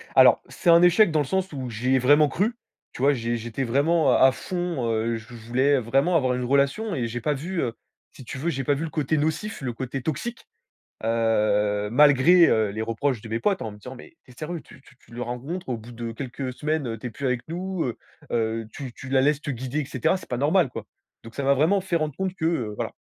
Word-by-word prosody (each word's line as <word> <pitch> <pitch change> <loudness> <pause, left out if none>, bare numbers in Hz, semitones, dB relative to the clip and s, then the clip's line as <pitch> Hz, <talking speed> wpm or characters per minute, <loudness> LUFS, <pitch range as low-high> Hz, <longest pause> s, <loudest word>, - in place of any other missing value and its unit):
Alors, - - +7
c'est 175 - -1
un 170 0 +8
échec 180 +2 +5
dans 155 - +2
le 145 - +1
sens 190 +6 -1
où 130 -3 -5
j'y 125 +4 0
ai - - +4
vraiment 145 +4 +5
cru, 205 - 0 0.4
tu - - -8
vois? 140 +2 +4
j'é 120 -2 -2
j'étais 120 +3 -4
vraiment 145 +6 +2
à - - +5
à - - +4
fond, 175 -3 -3
heu, 115 +1 0
je 110 +2 -12
voulais 130 +5 +1
vraiment 135 +9 +1
avoir 130 -5 +2
une 125 0 -2
relation 140 - +1
et 120 -4 -1
j'ai 120 +1 -5
pas 150 - +1
vu, 170 +6 -3
heu, 115 - -2 0.4
si - - -13
tu 125 - -6
veux, 165 +5 -1
j'ai 135 -5 -2
pas 145 - +2
vu 145 +3 -2
le 165 - -3
côté 155 0 -1
nocif, 160 +8 -2
le 130 -2 -2
côté 130 +2 -5
toxique, 160 - -4 0.6
heu, 105 -2 +1
malgré, 150 +6 +6
heu, 110 -2 +2
les 110 +2 -4
reproches 115 +2 -1
de 115 - -10
mes 115 +1 -1
potes 200 - 0
en 110 - -4
me 105 - -12
disant: 125 +5 -10
«Mais 130 - -14
tu 130 - -18
es - - -15
sérieux? 165 +1 -5
Tu - - -17 0.2
tu - - -20
la 120 +1 -4
rencontres, 135 +9 -5
au 120 - -1
bout 115 +2 -12
de 115 -1 -5
quelques 130 +1 -5
semaines, 150 0 -2
heu, 115 -1 -4
tu 110 - -11
es - - -5
plus 135 +5 -3
avec 125 -1 0
nous, 180 +1 -3
heu 120 - -4 0.3
heu, 115 -1 -1
tu 130 -4 -7
tu 130 - -10
la 135 0 +3
laisses 145 +1 +2
te 145 - -3
guider, 130 +4 -3
et - - -5
cetera, 130 +9 0
c'est 175 - -14
pas 125 - -2
normal, 155 +4 +3
quoi». - - -7 0.4
Donc 115 - -12
ça 140 - -3
m'a 140 +1 +4
vraiment 165 +8 +2
fait 185 -2 -2
rendre 155 -3 -3
compte 190 -1 -2
que, 160 - -3
heu, 125 -11 0
voilà. - - -4
135 Hz, 255 wpm, -25 LUFS, 120-160 Hz, 0.6 s, un